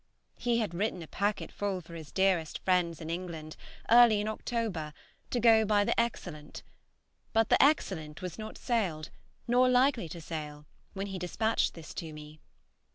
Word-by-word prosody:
He 240 -1 +1
had 215 -7 -1
written 185 -1 -2
a - - -11
packet 205 +5 -2
full 200 -2 -2
for 170 -1 -13
his 160 -4 -9
dearest 190 -5 +1
friends 180 -3 +2
in 160 0 -5
England, 165 -3 -5 0.4
early 235 -3 +7
in 210 - -2
October, 215 -9 -3 0.4
to 245 - 0
go 225 -1 +6
by 205 -1 +3
the - - +1
"Excellent;" 175 -10 -3 0.7
but 225 0 +3
the - - +6
"Excellent" 180 - +1
was 180 +1 -6
not 215 0 -7
sailed, 185 -11 -1 0.4
nor 250 +1 +4
likely 250 - +3
to 170 - -7
sail, 150 -2 -6 0.3
when 195 0 -3
he 195 -2 -5
despatched 220 +6 0
this 165 -2 -10
to 160 -2 -6
me. 150 0 -11
190 Hz, 165 wpm, -30 LUFS, 160-225 Hz, 0.7 s, early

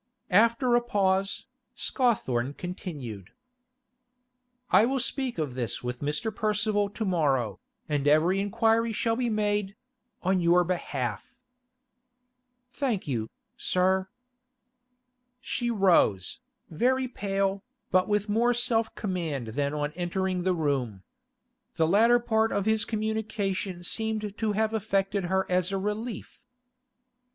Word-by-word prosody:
After 235 +5 +4
a 240 - +5
pause, 195 -4 0 0.3
Scawthorne 140 - 0
continued: 145 - -7 1.4
'I 215 - +6
will 265 +1 0
speak 260 0 -2
of 150 -5 -2
this 120 -3 -4
with 125 0 -4
Mr. 150 +10 -2
Percival 210 -1 +1
to 215 +2 -4
morrow, 135 - +1 0.3
and 145 -2 0
every 160 +6 +4
inquiry 225 +2 +2
shall 225 +1 0
be 245 0 0
made—on 210 -2 -2
your 175 +1 +5
behalf.' 125 - -3 1.4
'Thank 245 - -1
you, 115 -5 -2 0.3
sir.' 190 +1 +1 1.3
She 245 -1 -2
rose, 180 - +2 0.3
very 255 +10 +1
pale, 195 -4 -1 0.3
but 185 0 +3
with 210 0 +1
more 235 +3 +2
self 230 -2 0
command 165 - -3
than 140 +5 -1
on 150 0 -2
entering 180 +2 -2
the 185 0 +1
room. 130 - -1 0.7
The 160 - +3
latter 225 +7 +5
part 225 -2 +1
of 200 -1 0
his 220 0 +2
communication 210 -4 -2
seemed 215 +1 -2
to 215 -1 -1
have 220 +1 0
affected 195 -2 0
her 190 +2 +1
as 180 +1 +1
a 195 - 0
relief. 210 +4 -4
195 Hz, 120 wpm, -27 LUFS, 165-220 Hz, 1.4 s, I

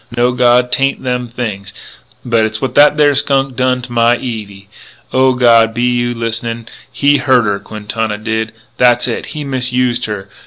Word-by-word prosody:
No, 120 +1 +2
God, 125 0 +2
'tain't 135 0 0
them 125 -1 -2
things. 105 -5 -6 0.5
But 115 -2 +2
it's 110 0 -2
what 135 - -3
that 145 +1 +5
there 145 -1 +4
skunk 135 -1 0
done 125 0 0
to 125 - -9
my 120 0 +3
Evie.... 105 -6 -7 0.5
O 130 0 +3
God, 115 -3 +4
be 120 - -1
you 120 0 0
listenin'? 115 0 -4 0.2
He 145 0 +2
hurt 130 -4 +3
her, 100 -1 -1
Quintana 105 +1 -4
did. 110 +1 -3 0.3
That's 120 -1 +3
it. 120 - -4
He 150 - -3
misused 125 -2 -1
her.... 105 -2 -5
120 Hz, 170 wpm, -14 LUFS, 110-125 Hz, 0.5 s, that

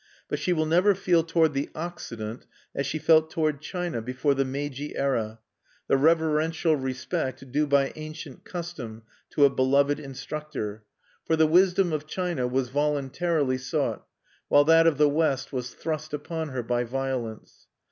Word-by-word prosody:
But - - -2
she 180 - 0
will 155 -3 +2
never 180 +6 +4
feel 180 -3 +3
toward 165 -2 +2
the 140 +1 -2
Occident, 120 -9 -6 0.3
as 140 - -2
she 155 - -2
felt 160 0 +4
toward 155 -3 -1
China 175 -7 -3
before 130 +5 0
the 135 0 +1
Meiji 140 +1 -4
era, 115 -5 -1 0.5
the - - +3
reverential 160 +2 +2
respect 130 0 -3
due 150 +2 +1
by 140 -1 +2
ancient 155 -3 -8
custom 150 -11 -7 0.3
to 145 - +4
a - - +6
beloved 140 +2 +2
instructor; 135 -6 -6 0.4
for 160 - +1
the 160 0 +4
wisdom 180 +2 +4
of 155 0 -3
China 175 -7 -1
was 125 0 -1
voluntarily 145 0 0
sought, 125 - -2 0.4
while 145 - +6
that 165 +2 +6
of 155 -4 +3
the 150 0 +5
West 145 -3 0
was 125 -1 -4
thrust 155 -1 -3
upon 160 +1 -4
her 130 -3 -3
by 120 +1 0
violence. 125 -3 -4
145 Hz, 155 wpm, -26 LUFS, 130-160 Hz, 0.5 s, a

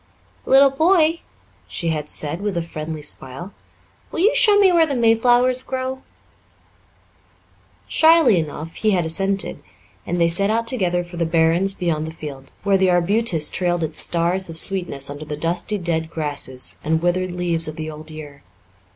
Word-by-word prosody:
"Little 270 +1 +6
boy," 325 +2 +3 0.5
she 170 - -4
had 150 -2 -3
said, 155 +4 -3
with 205 -3 -2
a 170 - -1
friendly 155 -1 -6
smile, 135 +9 -5 0.6
"will 325 - -3
you 425 +6 +3
show 415 -2 +6
me 395 -2 +5
where 335 -2 +4
the 280 - -2
mayflowers 245 +2 +3
grow?" 260 0 -4 1.9
Shyly 320 - +5
enough 155 +1 -6
he 215 - -1
had 180 -5 +1
assented, 195 +3 -1 0.5
and 175 +1 -2
they 170 - +4
set 195 +4 +1
out 230 +1 0
together 185 -8 0
for 175 0 -11
the 170 - 0
barrens 165 +4 +2
beyond 160 -4 -2
the - - -6
field, 140 -4 -9
where 195 -1 +2
the 190 -1 +3
arbutus 175 -2 +1
trailed 175 -2 -1
its 155 0 -3
stars 175 +2 0
of 165 - -7
sweetness 175 -7 -1
under 145 +2 -7
the 150 -1 -6
dusty 175 +6 -1
dead 165 -3 -2
grasses 145 -5 -3
and 160 +2 0
withered 180 +1 0
leaves 170 -2 -1
of 155 - -6
the 155 0 -5
old 155 +1 -11
year. 150 -2 -10
175 Hz, 170 wpm, -20 LUFS, 160-220 Hz, 1.9 s, Little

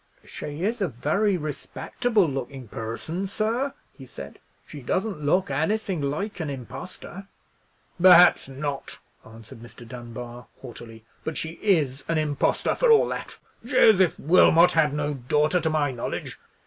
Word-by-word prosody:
"She 150 +3 -7
is 225 +3 -1
a 195 - +2
very 165 - 0
respectable 180 - -1
looking 135 -2 -5
person, 115 - -5
sir," 230 +7 -1 0.2
he 135 - -13
said; - - -10 0.3
"she 145 - -10
doesn't 185 - -2
look 180 +3 +1
anything 180 +4 -1
like 155 +9 -3
an 160 -3 -3
impostor." 175 +8 -8 0.7
"Perhaps 180 -4 +7
not!" 140 +1 -5 0.3
answered 110 0 -13
Mr. 120 0 -13
Dunbar, 120 0 -9 0.2
haughtily; 115 -3 -11 0.2
"but 160 - -4
she 160 +1 -5
is 150 -10 +1
an 165 - 0
impostor, 150 -2 0
for - - +1
all 445 - +5
that. - - -6 0.3
Joseph 190 -5 +4
Wilmot 170 +1 +5
had 155 -3 +3
no 150 0 -2
daughter, 150 +6 +1
to 160 - 0
my 150 -3 0
knowledge. 120 -2 -5
150 Hz, 140 wpm, -25 LUFS, 130-185 Hz, 0.7 s, Perhaps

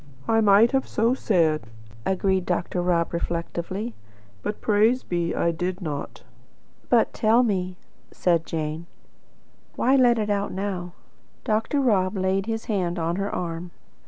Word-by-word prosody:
"I 225 0 +3
might 210 +2 +6
have 270 -1 0
so 230 +3 +2
said," 165 - +1 0.4
agreed 190 0 +1
Dr. 175 0 -1
Rob 175 -2 +1
reflectively; 170 +6 -3 0.5
"but 210 - -4
praise 220 +4 +3
be, 170 -1 -1
I 170 - +1
did 180 +3 -3
not." 150 -6 -5 0.7
"But 235 -2 +3
tell 230 +3 +4
me" 185 -5 -1 0.3
said 170 -2 +1
Jane 160 +1 -4 0.9
"why 260 +2 +3
let 245 -3 +5
it 210 -1 0
out 200 0 -1
now?" 185 -2 -4 0.5
Dr. 225 +6 0
Rob 200 -6 +2
laid 190 +2 0
his 225 -1 -3
hand 185 -5 -1
on 170 +1 -1
her 200 +1 -1
arm. 170 0 -4
190 Hz, 140 wpm, -24 LUFS, 170-220 Hz, 0.9 s, might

